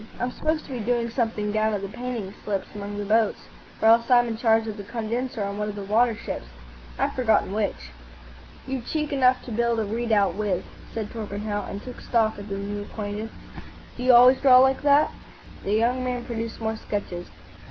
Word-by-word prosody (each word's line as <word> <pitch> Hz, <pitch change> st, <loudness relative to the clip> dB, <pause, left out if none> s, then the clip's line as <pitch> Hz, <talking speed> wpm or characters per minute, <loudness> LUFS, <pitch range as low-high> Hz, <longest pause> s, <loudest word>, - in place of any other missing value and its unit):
I'm 245 Hz, +1 st, -1 dB
supposed 310 Hz, +4 st, -1 dB
to -, -, -11 dB
be 250 Hz, -, -3 dB
doing 235 Hz, +1 st, 0 dB
something 225 Hz, -4 st, -1 dB
down 215 Hz, 0 st, +1 dB
at 200 Hz, -, -4 dB
the -, -, -2 dB
painting 240 Hz, -3 st, -5 dB
slips 200 Hz, -2 st, -2 dB
among 205 Hz, 0 st, -6 dB
the 205 Hz, -, -3 dB
boats, 220 Hz, +1 st, +2 dB, 0.4 s
or -, -, +6 dB
else 230 Hz, +2 st, +5 dB
I'm 240 Hz, -1 st, +5 dB
in 225 Hz, -, -2 dB
charge 225 Hz, -1 st, +3 dB
of 215 Hz, -1 st, -5 dB
the 205 Hz, -, -6 dB
condenser 230 Hz, +2 st, -3 dB
on 200 Hz, +1 st, -4 dB
one 210 Hz, 0 st, -1 dB
of 205 Hz, -, -5 dB
the 200 Hz, -, -5 dB
water 225 Hz, +3 st, +3 dB
ships. 135 Hz, -, -6 dB, 0.5 s
I've -, -, 0 dB
forgotten 225 Hz, -6 st, +2 dB
which." 205 Hz, -, -2 dB, 0.7 s
"You've 260 Hz, -3 st, -4 dB
cheek 300 Hz, -2 st, -2 dB
enough 255 Hz, -2 st, +3 dB
to 245 Hz, -, -8 dB
build 235 Hz, +1 st, +1 dB
a 220 Hz, -, 0 dB
redoubt 215 Hz, -3 st, +1 dB
with," 195 Hz, -2 st, -1 dB, 0.3 s
said 220 Hz, -2 st, -4 dB
Torpenhow, 205 Hz, -1 st, -4 dB
and 200 Hz, -, -6 dB
took 250 Hz, -1 st, -9 dB
stock 220 Hz, -3 st, +1 dB
of 205 Hz, +1 st, -8 dB
the 195 Hz, -, -3 dB
new 205 Hz, +1 st, -4 dB
acquaintance. 210 Hz, +1 st, -5 dB, 0.6 s
"Do -, -, -8 dB
you 255 Hz, +1 st, +5 dB
always 250 Hz, +2 st, +7 dB
draw 260 Hz, -2 st, +8 dB
like 265 Hz, +1 st, +5 dB
that?" 290 Hz, +1 st, +4 dB, 0.5 s
The 200 Hz, -, -1 dB
young 245 Hz, +3 st, +2 dB
man 250 Hz, -1 st, -2 dB
produced 230 Hz, -2 st, -4 dB
more 220 Hz, -1 st, -2 dB
sketches. 180 Hz, -5 st, -5 dB
225 Hz, 205 wpm, -25 LUFS, 205-245 Hz, 0.7 s, draw